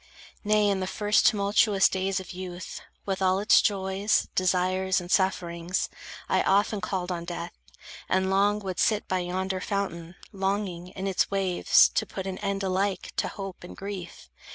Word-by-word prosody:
Nay, 210 0 +3
in 200 -1 +1
the 185 - -2
first 210 +2 +2
tumultuous 205 -2 +4
days 190 +1 -1
of 190 - -9
youth, 180 -1 -7 0.2
With 195 -1 -2
all 185 0 +3
its 205 +2 +5
joys, 200 +1 +1
desires, 185 +1 +1
and 175 0 -8
sufferings, 175 -2 0 0.4
I - - +2
often 205 +1 +2
called 185 -1 -2
on 170 -1 -3
death, 170 0 -6 0.6
and 190 0 +1
long 200 +2 +3
would 190 -2 -4
sit 215 -1 +2
By 185 - 0
yonder 185 +1 -2
fountain, 175 -4 -3 0.2
longing, 195 -2 -2
in 190 +1 -7
its 195 -2 +1
waves 190 -3 +4
To - - -1
put 190 - -6
an 190 -1 -4
end 200 -1 -2
alike 190 +1 -1
to - - +1
hope 195 -3 -7
and 175 - -10
grief. 195 -3 -7
190 Hz, 165 wpm, -27 LUFS, 185-200 Hz, 0.6 s, its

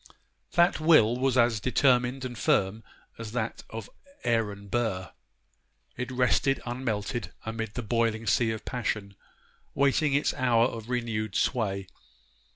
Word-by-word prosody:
That 175 -2 +4
will 155 -8 +5
was 130 -1 +1
as 120 -3 +3
determined 125 +2 +2
and 125 -1 -5
firm 105 0 +1 0.4
as 115 -1 -7
that 115 -2 -2
of 110 -2 -7 0.4
Aaron 105 -4 -1
Burr. 100 -5 -1 0.8
It 125 +1 -4
rested 130 +2 +2
unmelted 120 -4 -3
amid 110 -1 -4
the 125 - -3
boiling 115 0 0
sea 110 +2 +2
of 110 -1 -4
passion, 105 -5 -3 0.6
waiting 140 +1 +2
its 145 - +2
hour 120 -2 +3
of 115 -2 -5
renewed 115 -4 -2
sway. 100 -6 0
115 Hz, 130 wpm, -28 LUFS, 110-125 Hz, 0.8 s, will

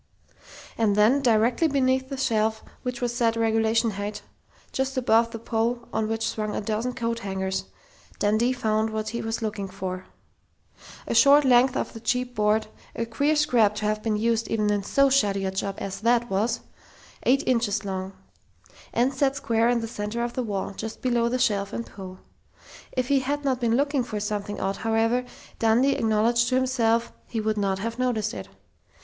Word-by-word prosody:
And 215 -3 +3
then, 220 +7 +4
directly 235 +5 +3
beneath 260 -2 +1
the 275 - -4
shelf 220 -3 0 0.2
which 250 -1 -4
was 240 -1 -1
set 230 -2 +2
regulation 225 0 +2
height, 205 +1 -5 0.5
just 265 0 -2
above 230 -2 +3
the 230 - -6
pole 230 +1 -2
on 220 - 0
which 225 0 -1
swung 215 -2 -3
a - - -1
dozen 220 +4 -2
coat 230 -1 -2
hangers, 190 -2 -3 0.5
Dundee 215 +4 +2
found 220 -3 0
what 215 0 -3
he 235 +2 -4
was 225 +1 -3
looking 210 -2 -3
for. 185 -1 -6 1.0
A - - -2
short 285 0 +6
length 250 0 +4
of - - -3
the 225 - -8
cheap 250 +2 -1
board, 215 0 +2 0.3
a 230 - -2
queer 285 +7 +1
scrap 235 -8 +3
to 210 - -3
have 215 0 0
been 215 -1 0
used 230 0 +1
even 215 -2 +1
in 205 -1 +1
so 275 +7 +2
shoddy 200 -7 +2
a 190 - -1
job 195 +1 -3
as 195 -1 -5
that 240 0 +2
wall 195 +1 +2
was.... 230 +1 -1 0.6
Eight 275 +3 +3
inches 225 -4 +1
long. 190 0 -4 0.8
And 250 +3 +1
set 270 0 +1
square 230 -4 +1
in 240 -1 +2
the 225 - -4
center 220 +1 -3
of 240 0 -3
the 255 - -2
wall, 200 -4 -3
just 220 +2 -7
below 240 -2 +2
the 250 - 0
shelf 200 -4 0
and 235 - -3
pole. 185 -2 -10 0.7
If 255 +1 -2
he 280 -1 +4
had 285 +2 -2
not 260 -2 +1
been 230 -1 +2
looking 280 -1 +1
for 215 -3 -4
something 205 0 -3
odd, 195 +1 -1
however, 225 +2 +1 0.3
Dundee 235 +5 +3
acknowledged 230 +2 +2
to 255 - +1
himself, 235 -3 +1
he 225 - -3
would 215 0 -1
not 195 -1 0
have 230 +4 -4
noticed 230 -3 0
it. - - -7
225 Hz, 190 wpm, -25 LUFS, 210-245 Hz, 1.0 s, short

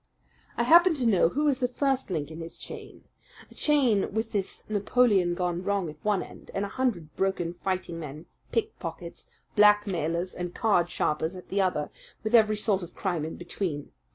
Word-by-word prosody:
"I - - +2
happen 345 +1 +6
to 260 -4 -1
know 195 -7 +4
who 295 +9 0
is 275 -3 +2
the 250 - +2
first 270 0 -1
link 155 -4 -3
in 160 - -8
his 165 0 -7
chain - - -10 0.5
a - - -13
chain 260 -9 +2
with 220 +2 -2
this 200 -3 -4
Napoleon 205 -4 +2
gone 175 -1 -1
wrong 195 -4 -1
at 155 - -18
one 210 -3 +1
end, - - -13
and 195 - 0
a - - -6
hundred 195 - -2
broken 190 -3 -1
fighting 180 -2 -3
men, 150 +1 -8 0.3
pickpockets, 170 -6 -4 0.3
blackmailers, 185 -5 +3
and 175 0 -5
card 185 -6 +2
sharpers 160 +3 -1
at 180 - -11
the 200 +1 +1
other, 180 -6 0 0.3
with 220 +1 -2
every 215 -2 +5
sort 205 -2 +1
of 175 -1 -9
crime 175 -6 -1
in 160 - -5
between. 175 -4 -4
190 Hz, 180 wpm, -27 LUFS, 170-220 Hz, 0.5 s, happen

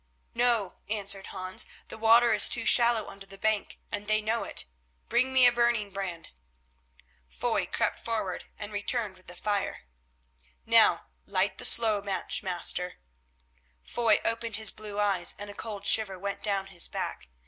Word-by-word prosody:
"No," 230 -6 0
answered 200 -2 0
Hans, 185 -1 -2 0.2
"the - - -8
water 230 +1 +5
is 210 - +7
too - - +3
shallow 235 -2 +6
under 195 0 -12
the 195 - -13
bank, 215 0 -2
and 205 0 -5
they 215 0 +2
know 220 +2 -2
it. - - -1 0.4
Bring 255 +2 +1
me 260 -1 +5
a 245 - +7
burning 235 -4 0
brand." 185 -4 -6 1.0
Foy - - -2
crept - - -2
forward, 215 -5 -4
and 210 0 -8
returned 205 0 -1
with 185 - -24
the 175 - -11
fire. 205 +1 -3 0.8
"Now - - +4 0.2
light 190 +1 -1
the - - -2
slow 220 -3 +4
match, 195 -1 -2
master." 180 -1 0 0.9
Foy 230 -3 +1
opened 230 -1 -2
his 220 -1 +3
blue 210 -1 -8
eyes 195 -4 +1
and 205 0 -8
a - - -12
cold 205 -2 -8
shiver 200 -3 +3
went 200 +2 -5
down 200 -2 -1
his 175 - +2
back. - - -6
205 Hz, 160 wpm, -28 LUFS, 195-225 Hz, 1.0 s, is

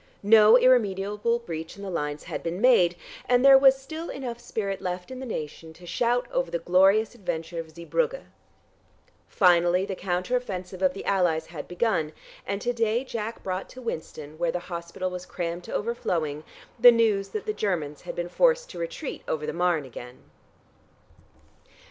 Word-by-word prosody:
No 215 +2 +7
irremediable 210 -2 +2
breach 165 -8 -7
in 200 - -9
the 195 - -5
lines 150 -3 -3
had - - -5
been 170 +2 -4
made, 200 -8 +5 0.3
and 250 +1 +4
there 275 0 +9
was 270 0 +6
still 315 +5 -7
enough 245 -3 -5
spirit 195 -5 -4
left 180 +3 -4
in 255 - -7
the 260 - -6
nation 160 -4 -6
to 175 +2 -15
shout 240 +6 0
over - - 0
the - - -1
glorious 195 +6 +3
adventure 170 -6 -4
of 165 -1 -6
Zeebrugge. 470 - -1 1.0
Finally 180 0 +3
the 195 -1 -4
counter 180 +6 -1
offensive 185 -6 -4
of 185 -1 +2
the - - -7
Allies 175 -5 +1
had 160 -3 -8
begun, 175 -5 0 0.3
and 200 +1 -2
to 245 - 0
day 230 +1 0
Jack 230 -3 -5
brought 185 0 -4
to 255 - -11
Winston, 155 - -6
where 170 -1 +1
the 180 - -2
hospital 170 +2 -4
was 180 0 -7
crammed 175 0 -4
to - - -9
overflowing, 165 -10 -2 0.4
the 245 +1 +10
news 220 -4 +2
that 430 - -5
the 425 - -1
Germans 160 - -2
had - - -7
been 175 0 -3
forced - - +2
to - - -8
retreat - - -5
over 155 -1 -2
the - - -3
Marne 175 -4 +1
again. 125 0 -10
195 Hz, 175 wpm, -26 LUFS, 170-240 Hz, 1.0 s, the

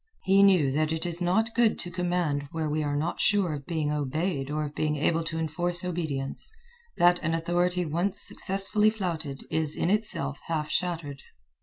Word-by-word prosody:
He 195 +1 +4
knew 185 -9 +5
that 155 +3 0
it 160 +2 -2
is 175 0 +1
not 220 +6 +1
good 235 -2 +3
to 175 - -6
command 175 -5 -1
where 160 -2 -2
we 150 +1 -1
are 145 -1 -1
not 155 +4 -2
sure 200 -6 +2
of 140 -2 -7
being 160 -4 -1
obeyed 150 0 -2
or 150 +1 -1
of 145 - -7
being 150 0 -1
able 165 +3 +1
to 160 -1 -4
enforce 175 +3 -1
obedience, 155 - -2 0.5
that 175 0 +5
an 165 0 -1
authority 175 +2 0
once 170 +5 0
successfully 195 +2 +3
flouted 165 -10 -4
is 155 -1 0
in 175 - 0
itself 200 -10 0
half 155 -2 -2
shattered. 165 -6 -2
165 Hz, 180 wpm, -27 LUFS, 150-180 Hz, 0.5 s, knew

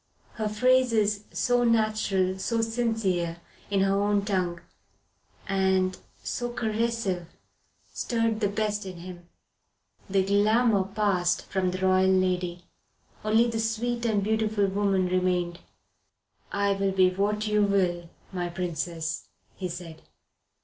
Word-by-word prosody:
Her 215 -1 -2
phrases, 215 -3 +2
so 245 -1 +1
natural, 215 -5 +1
so 230 +4 0
sincere, 220 -7 -1 0.3
in 200 -1 +2
her 195 +1 +2
own 205 0 +1
tongue, 180 -4 -1 0.9
and 190 -1 +2 0.3
so 240 -1 -3
caressive, 220 -6 -1 0.7
stirred 230 -2 0
the 210 - +2
best 210 0 -1
in 185 -2 -7
him. 175 0 -10 0.8
The 190 -1 +2
glamour 210 +1 +3
passed 195 -3 0
from 190 -1 0
the 185 +1 -2
royal 185 0 +4
lady; 180 -2 +1 0.6
only 220 +2 +4
the 230 -1 -2
sweet 230 +2 -1
and 210 -3 +1
beautiful 220 -1 +1
woman 195 -1 +1
remained. 180 -1 0 0.9
"I 200 0 +1
will 195 0 0
be 185 -1 +4
what 205 +3 0
you 210 -1 +2
will, 180 -4 +1 0.2
my 175 -1 -2
Princess," 170 -2 -3 0.3
he 185 -2 -4
said. 165 -2 -8
195 Hz, 120 wpm, -27 LUFS, 185-220 Hz, 0.9 s, royal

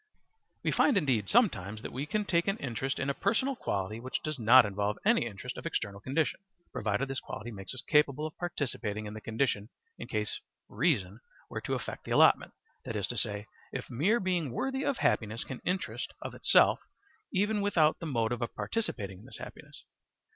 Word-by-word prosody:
We - - +2
find 265 - +4
indeed 130 - +1
sometimes 110 - +2
that - - -6
we 140 +4 -3
can 210 +2 0
take 170 -2 +2
an 195 +2 +1
interest 135 - -2
in 140 - -1
a 140 - +1
personal 230 - +1
quality 100 - -2
which 130 +2 -4
does 155 -3 -3
not 120 +2 +8
involve 105 +1 -1
any 120 - +4
interest 120 +4 -6
of - - -5
external 100 -10 -3
condition, 140 +6 0 0.3
provided 110 +5 0
this 135 0 -2
quality 120 +3 -7
makes 95 +3 -6
us 130 - -5
capable 150 0 +3
of 155 - -6
participating 125 - -3
in 105 - -6
the 110 - -7
condition 110 -2 0 0.3
in - - -6
case 105 -2 -1 0.3
reason 110 - +1 0.3
were - - -3
to - - -1
effect - - -5
the - - -8
allotment; - - +5 0.3
that 115 - -5
is 100 -3 0
to 120 - -3
say, 105 -1 +1 0.3
the - - -3
mere 190 - +3
being 180 - 0
worthy 265 - -1
of 275 - 0
happiness 110 0 +1
can 130 -4 -7
interest 185 +1 -2
of - - -6
itself - - +5 0.5
even 205 +2 +1
without 165 -6 +3
the 165 - -4
motive 120 -3 0
of 120 - -3
participating 100 - -3
in - - -15
this - - -8
happiness. - - -10
130 Hz, 190 wpm, -31 LUFS, 105-170 Hz, 0.5 s, not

